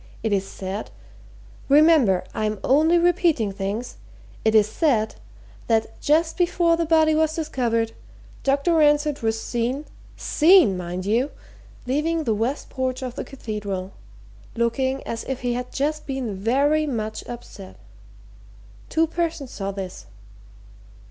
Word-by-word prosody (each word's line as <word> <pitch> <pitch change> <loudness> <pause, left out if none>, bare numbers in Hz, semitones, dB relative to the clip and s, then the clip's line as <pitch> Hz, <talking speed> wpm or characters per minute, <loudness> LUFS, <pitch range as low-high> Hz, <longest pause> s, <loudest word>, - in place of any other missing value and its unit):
"It's 200 -3 0
said 195 +3 -6 0.8
remember, 285 - +5
I'm 215 0 -1
only 315 +6 +4
repeating 340 - +2
things 200 +5 -4 0.5
it's 220 -1 +4
said 225 -4 +1 0.5
that 225 -1 0
just 320 +2 +2
before 345 -1 +2
the 335 -1 -1
body 315 -1 +4
was 315 0 +1
discovered, 235 -8 -1 0.5
Dr. 280 +5 +1
Ransford 295 -2 +3
was 225 0 0
seen 245 +6 -2 0.3
seen, 325 - +5
mind 180 +1 -5
you! 235 +7 +1 0.6
leaving 310 +5 0
the 225 - +1
west 230 +7 -2
porch 260 0 -2
of 250 -2 -4
the - - -5
Cathedral, 205 -7 -5 0.6
looking 260 +3 0
as 230 - -5
if 265 -1 -4
he 245 -1 -1
had 250 +1 -4
just 305 +3 -2
been 265 -7 -3
very 280 +9 +2
much 220 -5 -3
upset. 95 - -9 1.1
Two 320 +1 +2
persons 320 -5 -3
saw 195 -1 -4
this." 190 - -7
255 Hz, 125 wpm, -23 LUFS, 215-310 Hz, 1.1 s, remember